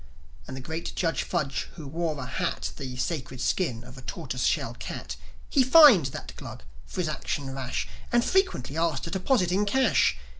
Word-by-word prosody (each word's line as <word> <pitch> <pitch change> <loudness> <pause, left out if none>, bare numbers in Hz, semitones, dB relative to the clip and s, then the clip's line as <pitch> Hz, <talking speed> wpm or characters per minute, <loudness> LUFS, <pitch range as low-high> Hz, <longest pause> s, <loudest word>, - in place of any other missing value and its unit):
And 130 - -6
the - - -6
great 160 +5 -5
Judge 165 -2 0
Fudge, 140 -2 -2
who 160 - -8
wore 160 +2 -2
for 140 - -5
a - - -5
hat 65 - -2
The 125 - -6
sacred 130 -3 -3
skin 125 -8 0
of 125 +2 -11
a - - -10
tortoiseshell - - -2
cat, - - -6 0.3
He 275 - +3
fined 260 - +8
that 130 - -8
Glug - - -9 0.2
for 185 - -3
his 170 - -1
action 140 -2 -3
rash, 130 -2 -3 0.2
And 240 0 +3
frequently 370 - +1
asked 165 -5 0
a 165 - -6
deposit 190 -1 +1
in 195 +3 +2
cash. 265 +5 +3
160 Hz, 185 wpm, -27 LUFS, 135-190 Hz, 0.3 s, fined